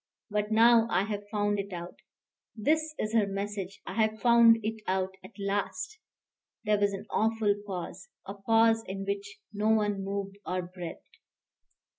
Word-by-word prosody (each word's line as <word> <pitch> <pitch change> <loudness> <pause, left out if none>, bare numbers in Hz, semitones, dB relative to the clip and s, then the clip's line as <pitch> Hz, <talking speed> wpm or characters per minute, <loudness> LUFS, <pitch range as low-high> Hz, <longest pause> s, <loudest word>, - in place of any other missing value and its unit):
But 210 +1 -1
now 230 +1 +6
I 185 -2 +2
have 205 -1 -5
found 205 -1 0
it 200 0 -4
out. 175 0 -6 0.6
This 305 +7 0
is 215 +1 -2
her 220 -3 +3
message. 195 -1 -4
I - - -6
have 220 0 +1
found 235 0 +6
it 220 +1 -3
out 190 0 0
at - - -10
last." 205 - -3 0.6
There 210 -1 +2
was 205 0 +2
an 195 - -6
awful 220 -1 +2
pause, 190 - -6 0.2
a 195 - -6
pause 225 +2 +3
in 195 +1 -4
which 200 +1 -4 0.2
no 210 +1 0
one 205 -3 +2
moved 200 0 -4
or 185 -1 -2
breathed. 175 -1 -9
205 Hz, 160 wpm, -29 LUFS, 195-225 Hz, 0.6 s, now